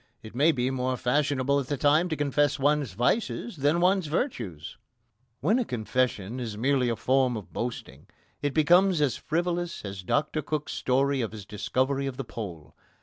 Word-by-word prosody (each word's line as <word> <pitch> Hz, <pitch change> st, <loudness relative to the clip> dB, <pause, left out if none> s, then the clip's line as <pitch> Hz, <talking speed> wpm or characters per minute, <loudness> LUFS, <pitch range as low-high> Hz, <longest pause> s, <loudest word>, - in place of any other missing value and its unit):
It 110 Hz, -, -10 dB
may 145 Hz, +7 st, +4 dB
be 130 Hz, -3 st, -1 dB
more 130 Hz, -1 st, -1 dB
fashionable 140 Hz, +1 st, +1 dB
at 135 Hz, -, -4 dB
the 145 Hz, -, -2 dB
time 155 Hz, +6 st, +3 dB
to 160 Hz, -, -1 dB
confess 145 Hz, 0 st, +1 dB
one's 145 Hz, -4 st, +1 dB
vices 175 Hz, -, -1 dB
than 145 Hz, +4 st, +2 dB
one's 185 Hz, -1 st, +2 dB
virtues. 115 Hz, -, -3 dB, 0.6 s
When 225 Hz, +5 st, +3 dB
a -, -, +2 dB
confession 120 Hz, -, -1 dB
is 115 Hz, -4 st, -5 dB
merely 130 Hz, +1 st, +2 dB
a 115 Hz, -, 0 dB
form 130 Hz, 0 st, +2 dB
of 90 Hz, -6 st, -10 dB
boasting 95 Hz, -, -5 dB, 0.3 s
it 145 Hz, -1 st, -1 dB
becomes 175 Hz, +3 st, +4 dB
as 145 Hz, -4 st, +2 dB
frivolous 175 Hz, -2 st, -2 dB
as 100 Hz, -1 st, -6 dB
Dr 145 Hz, -, 0 dB
Cook's 150 Hz, +1 st, -3 dB
story 135 Hz, +1 st, +1 dB
of 115 Hz, -2 st, -3 dB
his 105 Hz, -3 st, -8 dB
discovery 130 Hz, +7 st, -1 dB
of 130 Hz, -2 st, -5 dB
the 135 Hz, -, -4 dB
Pole. 90 Hz, -11 st, -8 dB
135 Hz, 175 wpm, -27 LUFS, 120-150 Hz, 0.6 s, may